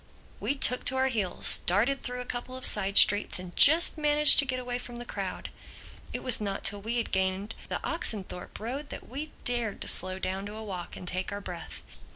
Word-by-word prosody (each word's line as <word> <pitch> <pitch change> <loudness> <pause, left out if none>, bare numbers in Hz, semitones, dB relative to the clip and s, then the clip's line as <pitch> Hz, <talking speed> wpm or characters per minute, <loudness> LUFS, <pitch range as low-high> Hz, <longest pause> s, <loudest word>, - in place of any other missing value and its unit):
We 280 - -3
took 250 -2 +3
to 260 - +3
our 265 0 0
heels, 205 -8 +3
darted 230 +10 +1
through 250 0 -6
a - - -9
couple 250 +1 -8
of 260 - 0
side 200 -1 +2
streets 205 0 +6
and 180 -1 -10
just 320 +2 +5
managed 300 0 +6
to 280 - +2
get 255 -1 -4
away 245 -1 -6
from 245 -1 -10
the 240 0 -9
crowd. - - -8 0.6
It - - -7
was 255 -4 +2
not 200 -2 -5
till 205 0 -2
we 225 +4 -5
had 235 - -4
gained 190 +3 -3 0.2
the - - -4
Oxenthorpe 190 -4 -3
Road 270 +6 -7
that - - -11
we 285 +5 -8 0.2
dared 240 -4 -4
to - - -7
slow 185 +1 +1
down 190 +1 -6
to 210 - -10
a 220 - -9
walk 185 -5 -9
and 180 - -11
take 185 +1 -5
our 200 - -6
breath. 175 -4 -11
225 Hz, 215 wpm, -26 LUFS, 195-255 Hz, 0.6 s, streets